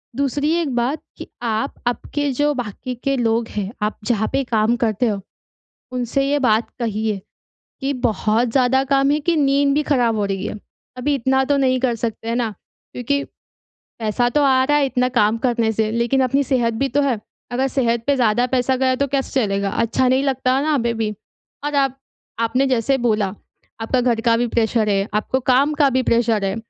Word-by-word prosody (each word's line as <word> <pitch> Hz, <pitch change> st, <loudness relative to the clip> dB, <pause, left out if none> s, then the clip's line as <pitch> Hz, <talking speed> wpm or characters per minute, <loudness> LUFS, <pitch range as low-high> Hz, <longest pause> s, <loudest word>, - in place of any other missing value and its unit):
दूसरी 285 Hz, +3 st, 0 dB
एक 335 Hz, -4 st, 0 dB
बात 255 Hz, +6 st, 0 dB, 0.2 s
कि, -, -, -8 dB
आप 225 Hz, +2 st, -1 dB
आपके 285 Hz, +4 st, -1 dB
जो 290 Hz, +3 st, +1 dB
बाकी 250 Hz, 0 st, -5 dB
के 275 Hz, 0 st, +1 dB
लोग 230 Hz, -1 st, +1 dB
हैं, 205 Hz, -1 st, -4 dB
आप 210 Hz, +1 st, -1 dB
जहाँ 220 Hz, -2 st, +1 dB
पे 275 Hz, -, +1 dB
काम 225 Hz, -1 st, +1 dB
करते 230 Hz, +1 st, 0 dB
हो, 205 Hz, -3 st, -1 dB, 0.7 s
उनसे 250 Hz, +2 st, -1 dB
ये 290 Hz, +1 st, +2 dB
बात 225 Hz, -4 st, +2 dB
कहिए 215 Hz, -3 st, -1 dB, 0.6 s
कि 275 Hz, +1 st, -1 dB
बहुत 235 Hz, -2 st, 0 dB
ज़्यादा 265 Hz, 0 st, +3 dB
काम 275 Hz, 0 st, +2 dB
है, 295 Hz, +1 st, +1 dB
कि 335 Hz, +3 st, +1 dB
नींद 280 Hz, -1 st, +3 dB
भी 300 Hz, -, +2 dB
ख़राब 245 Hz, -6 st, +1 dB
हो 210 Hz, -, 0 dB
रही 195 Hz, -1 st, -2 dB
है। -, -, -5 dB, 0.4 s
अभी 275 Hz, +3 st, 0 dB
इतना 265 Hz, 0 st, +1 dB
तो 285 Hz, +1 st, +1 dB
नहीं 260 Hz, -2 st, +2 dB
कर 250 Hz, -2 st, +1 dB
सकते 225 Hz, 0 st, -4 dB
हैं 230 Hz, -, 0 dB
ना, 235 Hz, -2 st, 0 dB, 0.4 s
क्योंकि 280 Hz, +3 st, -1 dB, 0.8 s
पैसा 225 Hz, +2 st, 0 dB
तो -, -, +4 dB
आ 260 Hz, -2 st, +4 dB
रहा 295 Hz, +2 st, +2 dB
है 290 Hz, -, +3 dB
इतना 250 Hz, -1 st, +1 dB
काम 215 Hz, +2 st, +3 dB
करने 230 Hz, -2 st, +1 dB
से 220 Hz, 0 st, 0 dB
लेकिन 235 Hz, +4 st, +1 dB
अपनी 270 Hz, +3 st, +1 dB
सेहत 240 Hz, -4 st, +1 dB
भी 275 Hz, +5 st, 0 dB
तो 285 Hz, +4 st, +1 dB
है। 265 Hz, -6 st, 0 dB, 0.3 s
अगर 260 Hz, +2 st, 0 dB
सेहत 235 Hz, -4 st, 0 dB
पे 285 Hz, -, +3 dB
ज़्यादा 240 Hz, -1 st, +2 dB
पैसा 260 Hz, +1 st, +1 dB
गया 260 Hz, 0 st, +2 dB
तो 280 Hz, +2 st, 0 dB
कैसे 270 Hz, -1 st, 0 dB
चलेगा? 200 Hz, -1 st, -1 dB
अच्छा 230 Hz, +5 st, +1 dB
नहीं 260 Hz, +2 st, +2 dB
लगता 265 Hz, -1 st, +1 dB
ना 300 Hz, 0 st, +1 dB
बेबी। 230 Hz, -3 st, -1 dB, 0.6 s
और 295 Hz, 0 st, -2 dB
आप 270 Hz, -2 st, +1 dB, 0.4 s
आपने 230 Hz, +4 st, +1 dB
जैसे 260 Hz, +1 st, +1 dB
बोला, 215 Hz, -3 st, +1 dB, 0.5 s
आपका 250 Hz, +3 st, +1 dB
घर 240 Hz, -2 st, +1 dB
का 230 Hz, -1 st, +3 dB
भी 240 Hz, +1 st, 0 dB
प्रेशर 225 Hz, -1 st, +1 dB
है, 195 Hz, 0 st, +1 dB
आपको 215 Hz, +5 st, 0 dB
काम 265 Hz, +4 st, +2 dB
का 280 Hz, -, +5 dB
भी 260 Hz, 0 st, +1 dB
प्रेशर 230 Hz, -4 st, +1 dB
है, 195 Hz, 0 st, -1 dB
250 Hz, 200 wpm, -20 LUFS, 225-275 Hz, 0.8 s, का